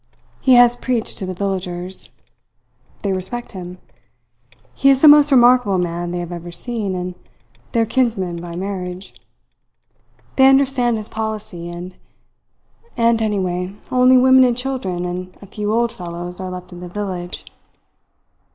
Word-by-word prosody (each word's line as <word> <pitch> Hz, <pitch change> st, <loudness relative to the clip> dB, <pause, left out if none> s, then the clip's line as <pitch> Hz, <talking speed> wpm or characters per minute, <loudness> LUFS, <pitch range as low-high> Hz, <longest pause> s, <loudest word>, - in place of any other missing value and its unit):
He 260 Hz, -2 st, +4 dB
has 245 Hz, 0 st, +6 dB
preached 245 Hz, -2 st, -2 dB
to 190 Hz, -, -4 dB
the 185 Hz, -, -3 dB
villagers. 185 Hz, -1 st, -3 dB, 0.9 s
They 200 Hz, -2 st, 0 dB
respect 190 Hz, +6 st, -4 dB
him. 180 Hz, -2 st, -8 dB, 1.0 s
He 275 Hz, -, +3 dB
is 270 Hz, -1 st, +4 dB
the -, -, +9 dB
most 295 Hz, 0 st, +7 dB
remarkable 245 Hz, -6 st, +5 dB
man 175 Hz, -1 st, -2 dB
they 175 Hz, -, -3 dB
have 175 Hz, 0 st, -5 dB
ever 175 Hz, 0 st, -7 dB
seen, 205 Hz, +1 st, -2 dB
and 180 Hz, 0 st, -4 dB, 0.6 s
their 230 Hz, -2 st, +2 dB
kinsman 215 Hz, -8 st, -1 dB
by 170 Hz, -1 st, -7 dB
marriage. 185 Hz, 0 st, -5 dB, 1.2 s
They 265 Hz, 0 st, +7 dB
understand 265 Hz, -3 st, +3 dB
his 215 Hz, -1 st, -5 dB
policy. 215 Hz, -6 st, -5 dB
And 175 Hz, +1 st, -8 dB, 1.0 s
anyway 205 Hz, -6 st, 0 dB, 0.2 s
only 255 Hz, 0 st, +5 dB
women 260 Hz, +1 st, +6 dB
and 245 Hz, -2 st, +2 dB
children 250 Hz, -9 st, -3 dB
and 180 Hz, +1 st, -6 dB
a -, -, -12 dB
few 210 Hz, +1 st, -4 dB
old 235 Hz, +1 st, +1 dB
fellows 175 Hz, 0 st, -7 dB
are 185 Hz, -, -4 dB
left 180 Hz, 0 st, -8 dB
in 175 Hz, -, -10 dB
the 180 Hz, 0 st, -8 dB
village. 180 Hz, -2 st, -5 dB
195 Hz, 140 wpm, -19 LUFS, 180-240 Hz, 1.2 s, the